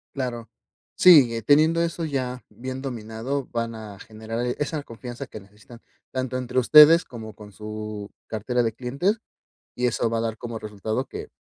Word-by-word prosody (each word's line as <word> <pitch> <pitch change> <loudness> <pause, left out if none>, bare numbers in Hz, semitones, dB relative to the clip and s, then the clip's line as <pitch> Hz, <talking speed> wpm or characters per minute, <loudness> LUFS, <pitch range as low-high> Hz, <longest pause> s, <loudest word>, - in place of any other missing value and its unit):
Claro, 120 -4 -4 0.5
sí, 135 -11 +7
teniendo 155 +7 +4
eso 170 0 -2
ya 130 -4 -3
bien 130 +1 -7
dominado 125 +2 -4
van 115 -1 -3
a 105 -3 -9
generar 110 +2 -7 0.2
esa 150 0 -2
confianza 120 +1 -8
que 110 - -9
necesitan, 105 +4 -16 0.3
tanto 130 -1 -3
entre 125 0 -2
ustedes 150 +6 +8
como 110 -3 -9
con 105 -1 -13
su 105 0 -7 0.2
cartera 120 +3 -1
de 115 - 0
clientes, 140 - -1 0.5
y 125 0 0
eso 120 0 0
va 115 - 0
a - - 0
dar 115 -1 -3
como 115 -1 -6
resultado 110 +4 -3
que, - - -8
120 Hz, 165 wpm, -24 LUFS, 110-135 Hz, 0.5 s, ustedes